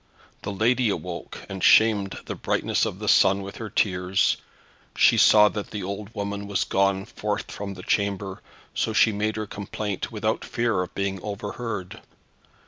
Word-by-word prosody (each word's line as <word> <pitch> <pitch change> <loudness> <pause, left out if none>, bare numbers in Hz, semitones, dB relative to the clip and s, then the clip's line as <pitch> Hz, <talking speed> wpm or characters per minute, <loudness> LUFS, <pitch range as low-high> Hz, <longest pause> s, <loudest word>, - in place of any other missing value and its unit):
The - - -4
lady 115 +4 +2
awoke, 90 -3 -5
and 95 -1 -6
shamed 105 -3 +5
the - - -4
brightness - - 0
of - - -5
the - - -6
sun 100 +1 +4
with 100 - -8
her 110 -2 -6
tears. 95 -2 +1 0.6
She - - +6
saw 105 -1 +7
that 105 -1 -5
the 105 -2 -5
old 100 +3 -6
woman 100 0 -4
was 100 -2 0
gone 95 0 +1
forth 105 -1 -4
from 100 -1 -6
the 90 - -10
chamber, 100 -2 -1 0.3
so - - -1
she 110 - +5
made 105 +1 -1
her 110 0 -3
complaint 100 -1 -5
without - - -1
fear 115 -5 0
of 90 - -6
being 100 -1 -2
overheard. 105 -1 -5
100 Hz, 165 wpm, -25 LUFS, 95-105 Hz, 0.6 s, saw